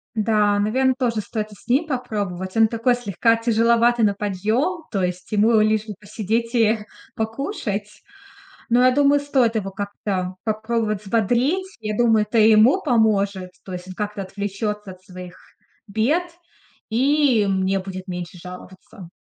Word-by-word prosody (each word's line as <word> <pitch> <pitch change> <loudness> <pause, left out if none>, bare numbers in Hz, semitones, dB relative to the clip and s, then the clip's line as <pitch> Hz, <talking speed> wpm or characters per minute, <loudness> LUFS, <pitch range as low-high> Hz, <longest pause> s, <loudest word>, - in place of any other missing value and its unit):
Да, 210 -1 +2
наверно, 260 +6 +2
тоже 235 -4 0
стоит 215 0 -5
и - - -12
с - - -21
ним 275 +7 +2
попробовать. 205 - -4
Он 225 0 +5
такой 230 +2 +1
слегка 230 0 +1
тяжеловатый 230 +1 +3
на 205 - +2
подъем, 215 - -1
то 195 - -1
есть 180 0 -4
ему 220 +2 +4
лишь 215 0 +1
бы 210 - -6
посидеть 220 +3 -3
и 225 -2 +3 0.4
покушать. 220 - -3 0.8
Но 245 +2 +4
я 255 - +6
думаю, 285 +2 +4
стоит 265 -5 +1
его 195 -3 -2
как-то 195 -2 -4
попробовать 220 -1 -1
взбодрить. 245 - 0
Я 215 -1 -3
думаю, 225 -3 +3
это 220 +2 -2
и 220 0 +6
ему 230 - +5
поможет. 205 - +1
То 185 - -7
есть 180 0 -7
он 185 - -8
как-то 210 0 -4
отвлечётся 205 +1 -4
от 185 0 -15
своих 180 -1 -11 0.5
бед, 230 - +1 0.7
и 260 -1 +3
мне 190 0 +1
будет 185 0 -7
меньше 180 -1 -6
жаловаться. 180 +1 -12
215 Hz, 155 wpm, -22 LUFS, 195-235 Hz, 0.8 s, я